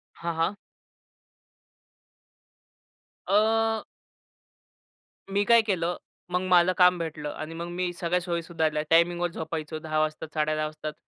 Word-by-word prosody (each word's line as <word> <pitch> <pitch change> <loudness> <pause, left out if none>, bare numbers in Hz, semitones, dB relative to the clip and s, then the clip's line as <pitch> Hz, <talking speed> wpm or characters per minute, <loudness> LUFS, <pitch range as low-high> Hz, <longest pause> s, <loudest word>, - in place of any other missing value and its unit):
हां, 170 0 -3
हां. 165 +5 0 2.7
अ 225 +2 +2 1.5
मी 200 +1 +1
काय 235 -1 +6
केलं, 180 -5 -1 0.3
मग 180 - +1
मला 180 0 +5
काम 180 0 +6
भेटलं 150 -2 -4
आणि 155 +1 -7
मग 170 +1 -5
मी 180 0 -2
सगळ्या 175 0 0
सोयी 170 -1 -2
सुधारल्या. 160 -3 -1
टायमिंगवर 175 +1 +3
झोपायचो 155 -1 -5
10 155 0 -2
वाजता, 155 0 -1
10:30 155 0 0
वाजतात 155 0 -6
170 Hz, 120 wpm, -27 LUFS, 155-180 Hz, 2.7 s, काय